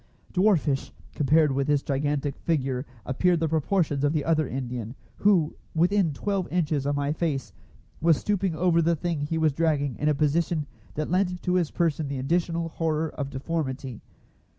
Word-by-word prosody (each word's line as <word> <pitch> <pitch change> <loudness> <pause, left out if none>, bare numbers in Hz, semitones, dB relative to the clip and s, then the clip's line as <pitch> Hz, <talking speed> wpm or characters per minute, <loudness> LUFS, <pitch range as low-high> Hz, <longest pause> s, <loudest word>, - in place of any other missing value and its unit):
Dwarfish, 175 -8 +2 0.2
compared 150 +1 +3
with 135 0 0
this 145 -1 +2
gigantic 145 0 -1
figure, 135 -4 -1 0.2
appeared 175 +6 +2
the 165 - +1
proportions 155 -2 +1
of 145 +1 +2
the 150 -3 0
other 155 -3 +2
Indian, 125 -2 -4 0.2
who, 185 -7 +3 0.2
within 180 +1 +3
twelve 195 +5 -2
inches 155 -5 0
of 145 - +1
my 145 +1 0
face, 155 -5 -2 0.5
was 165 -1 +4
stooping 195 -4 0
over 170 +1 +3
the 165 +1 +2
thing 165 -1 -2
he 165 - -1
was 160 -2 +2
dragging 145 -4 +1
in 150 - +1
a 150 - +2
position 155 +1 +1 0.3
that 155 +1 -2
lent 180 -1 0
to 180 - 0
his 175 -4 +2
person 160 -3 0
the 140 0 -3
additional 165 +4 0
horror 160 -1 -1
of 140 -2 -4
deformity. 135 -4 -4
155 Hz, 170 wpm, -26 LUFS, 140-170 Hz, 0.5 s, was